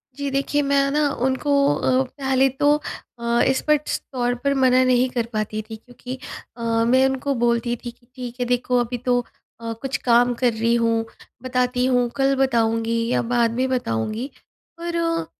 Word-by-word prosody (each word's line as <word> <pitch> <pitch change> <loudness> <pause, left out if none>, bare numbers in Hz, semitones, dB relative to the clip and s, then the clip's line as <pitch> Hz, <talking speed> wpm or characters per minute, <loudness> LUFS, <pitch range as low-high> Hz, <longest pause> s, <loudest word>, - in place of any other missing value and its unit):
जी 285 0 -3
देखिए, 275 +2 0
मैं 280 0 +2
ना 295 0 +2 0.2
उनको 265 +2 0 0.2
अ, 260 0 +2
पहले 265 0 +1
तो 290 +3 +2 0.5
अ, 235 0 +1 0.2
स्पष्ट 300 -1 0
तौर 245 -1 0
पर 280 0 +2
मना 255 -1 +4
नहीं 255 0 +3
कर 240 -2 -2
पाती 215 0 -2
थी 220 - -6
क्योंकि 245 +3 -9 0.4
अ, - - -9 0.3
मैं 260 +2 +4
उनको 265 +1 -1
बोलती 235 0 +1
थी 240 - -4
कि 240 0 -30
ठीक 250 -2 -7
है 245 - 0
देखो 245 0 0
अभी 240 +1 -2
तो 245 -1 +3 0.4
अ, 230 0 -4
कुछ 270 -1 -2
काम 245 0 +3
कर 245 -2 +3
रही 230 +1 +1
हूँ 230 -1 +1 0.4
बताती 250 0 0
हूँ, 245 -2 +2
कल 275 0 +2
बताऊँगी 230 -3 +1
या - - +2
बाद 235 -1 +1
में 255 +2 +1
बताऊँगी। 220 - -2 0.5
पर, 335 -1 -1
250 Hz, 170 wpm, -22 LUFS, 235-270 Hz, 0.5 s, मना